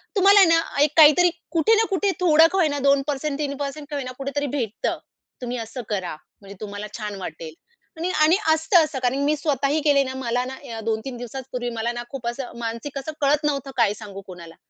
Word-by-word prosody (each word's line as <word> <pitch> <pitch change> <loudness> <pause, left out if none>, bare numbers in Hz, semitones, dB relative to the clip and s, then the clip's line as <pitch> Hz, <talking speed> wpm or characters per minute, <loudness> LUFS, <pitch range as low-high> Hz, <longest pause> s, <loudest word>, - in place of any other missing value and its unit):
तुम्हाला 400 +1 +6
आहे 380 - +7
ना, 330 0 +4 0.2
एक 295 - +2
काहीतरी 315 +3 +7 0.2
कुठे 345 +7 +3
ना 445 +1 +3
कुठे 390 0 +1
थोडं 325 -2 +6
का 385 - -1
होईना 295 -4 +1
2% 280 +1 0
3% 285 0 -4
का 295 - -4
होईना 255 -3 -4
कुठेतरी 280 +1 -3
भेटतं. 225 -5 -2 0.4
तुम्ही 250 0 -4
असं 230 +2 -6
करा. 190 -6 -3 0.3
म्हणजे 200 0 -11
तुम्हाला 205 0 -6
छान 210 -2 -5
वाटेल. 160 -3 -7 0.4
आणि 345 +3 -2
आणि 320 +4 +6 0.2
असतं 320 +2 +4
असं 300 -4 -4
कारण 255 +1 0
मी 300 +1 +2
स्वतःही 285 0 0
केले 285 -2 +4
ना 260 -1 -5
मला 245 -1 -1
ना 260 +1 -6 0.2
अ, - - -5
2-3 225 +3 -3
दिवसाच 245 +2 -7
पूर्वी 245 -1 -3
मला 230 +1 -2
ना 240 0 -5
खूप 260 -4 -6
असं 240 0 -5
मानसिक 235 +5 -5
असं 310 +4 -6
कळत 290 +2 +2
नव्हतं, 275 -2 -1
काय 200 - +3
सांगू 200 -2 -9
कोणाला 170 -3 -11
275 Hz, 205 wpm, -23 LUFS, 235-305 Hz, 0.4 s, आहे